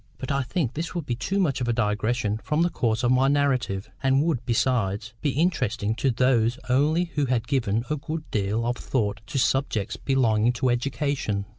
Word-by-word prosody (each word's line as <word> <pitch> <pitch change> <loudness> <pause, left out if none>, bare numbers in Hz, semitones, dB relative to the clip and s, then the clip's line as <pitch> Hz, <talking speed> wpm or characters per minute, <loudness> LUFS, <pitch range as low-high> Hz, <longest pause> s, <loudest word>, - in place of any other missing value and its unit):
But 130 - -4
I 140 0 +1
think 135 - -2
this 165 +3 -4
would 170 -4 -3
be 120 - -1
too 190 +11 -2
much 140 -9 +1
of 120 - -1
a 120 - +2
digression 110 0 0
from 155 +2 +1
the 175 - +1
course 115 -2 0
of 120 - +3
my 130 +1 +4
narrative, 130 -8 +1
and 135 +1 +3
would, 155 -7 0
besides, 115 -3 0
be 150 - +1
interesting 115 - 0
to 135 - +1
those 120 -1 +2
only 155 +7 +2
who 145 -3 0
had 120 -2 0
given 115 -5 0
a 150 - -1
good 155 +3 -5
deal 105 +2 0
of 120 +1 -1
thought 110 -4 -1
to - - -4
subjects 130 -6 0
belonging 120 -4 +2
to 125 +1 +1
education. 125 -5 -1
125 Hz, 195 wpm, -25 LUFS, 110-140 Hz, -, my